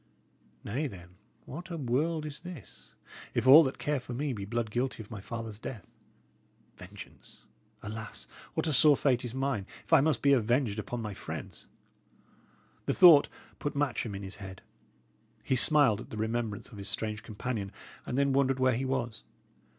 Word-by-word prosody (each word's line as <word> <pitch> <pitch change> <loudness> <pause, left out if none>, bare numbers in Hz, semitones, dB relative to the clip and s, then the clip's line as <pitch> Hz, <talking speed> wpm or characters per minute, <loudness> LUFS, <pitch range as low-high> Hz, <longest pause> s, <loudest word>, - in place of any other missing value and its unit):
Nay, 135 +9 -2
then, 90 -6 -11 0.4
what 170 +7 -8
a 170 - -4
world 150 +4 0
is 150 -2 -7
this, 175 - -12 0.4
if - - +1
all 150 +5 +10
that 130 - -3
care 150 -1 -1
for 125 0 -8
me 140 +1 -1
be 100 -4 -5
blood 115 +1 -2
guilty 120 -1 -2
of 105 - -18
my 105 -3 -6
father's 115 -1 -6
death? 115 -2 -7 0.9
Vengeance! - - -13 0.4
Alas! 110 +1 -7 0.3
what - - 0
a 155 - +1
sore 145 0 +6
fate 125 -4 +2
is 120 0 -5
mine, 130 -7 -1 0.2
if - - -4
I 160 - +8
must 155 +1 +1
be 140 0 +6
avenged 120 -2 +1
upon 115 +2 -4
my 105 -2 -4
friends!" - - -8 1.2
The - - +1
thought 170 -6 +8 0.3
put 145 0 -3
Matcham 130 -7 -1
in 100 - -6
his 95 0 -6
head. 95 -2 -9 0.8
He 130 - +1
smiled 130 -5 +4
at - - -11
the 110 - -7
remembrance 110 -1 -2
of 110 -5 -11
his 100 0 -3
strange 105 +1 -2
companion, 105 -2 -4 0.3
and 125 - -4
then 140 -1 +2
wondered 135 -1 +2
where 130 0 +3
he 130 +3 -2
was. 120 -4 -2
125 Hz, 175 wpm, -30 LUFS, 110-140 Hz, 1.2 s, all